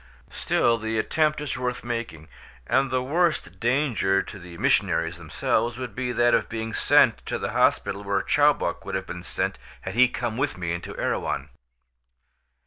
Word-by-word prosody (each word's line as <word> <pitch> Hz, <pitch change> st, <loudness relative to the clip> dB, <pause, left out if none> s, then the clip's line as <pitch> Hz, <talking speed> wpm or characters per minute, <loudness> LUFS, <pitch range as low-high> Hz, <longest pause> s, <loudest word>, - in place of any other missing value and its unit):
Still 115 Hz, -1 st, +1 dB
the 110 Hz, +1 st, -2 dB
attempt 155 Hz, +6 st, +1 dB
is 145 Hz, -3 st, -3 dB
worth 125 Hz, -1 st, -2 dB
making, 115 Hz, -10 st, -5 dB, 0.4 s
and 135 Hz, -, +2 dB
the 130 Hz, 0 st, 0 dB
worst 165 Hz, +4 st, 0 dB
danger 120 Hz, -6 st, +1 dB
to 105 Hz, -, -10 dB
the 85 Hz, -1 st, -11 dB
missionaries 80 Hz, +1 st, +1 dB
themselves 110 Hz, +8 st, -1 dB
would 125 Hz, -2 st, -5 dB
be 125 Hz, -1 st, -2 dB
that 120 Hz, 0 st, +3 dB
of -, -, +2 dB
being 110 Hz, 0 st, -4 dB
sent -, -, +4 dB
to -, -, -1 dB
the -, -, -3 dB
hospital 100 Hz, -, +1 dB
where 100 Hz, -1 st, 0 dB
Chowbok -, -, +2 dB
would -, -, -4 dB
have 95 Hz, 0 st, -2 dB
been 90 Hz, -, -7 dB
sent 90 Hz, -, -2 dB, 0.2 s
had 95 Hz, -, -5 dB
he 125 Hz, +3 st, +6 dB
come 120 Hz, -2 st, -3 dB
with 140 Hz, -3 st, -1 dB
me 85 Hz, -1 st, -3 dB
into 85 Hz, -, -6 dB
Erewhon. -, -, -2 dB
115 Hz, 170 wpm, -25 LUFS, 95-125 Hz, 0.4 s, he